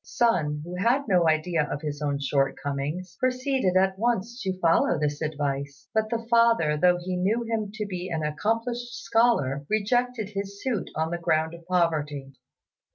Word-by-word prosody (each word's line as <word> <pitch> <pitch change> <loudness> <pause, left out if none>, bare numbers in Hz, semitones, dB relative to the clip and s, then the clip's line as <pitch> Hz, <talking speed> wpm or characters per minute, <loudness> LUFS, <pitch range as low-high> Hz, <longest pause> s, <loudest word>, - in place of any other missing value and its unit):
Sun, 155 -11 +1
who 180 +1 -6
had 240 +8 +2
no 180 -5 +4
idea 155 -1 +1
of 145 - -4
his 145 -1 -4
own 145 -1 0
shortcomings, 145 +5 -2
proceeded 255 -6 +1
at 190 0 +2
once 235 +1 -1
to 190 -1 -3
follow 170 0 +3
this 145 0 -1
advice; 140 -2 -3
but 220 0 +1
the 230 0 -2
father, 230 -10 +4
though 180 +3 +4
he 180 +1 -4
knew 205 +6 +1
him 225 -2 -2
to 215 -1 -3
be 185 -2 -5
an 160 -2 -2
accomplished 230 +9 -2
scholar, 225 - +2
rejected 225 +1 0
his 200 0 -5
suit 245 -8 -1
on 160 +1 -1
the 175 - -2
ground 160 -1 +1
of 170 0 -11
poverty. 150 -6 0
180 Hz, 165 wpm, -26 LUFS, 150-225 Hz, -, no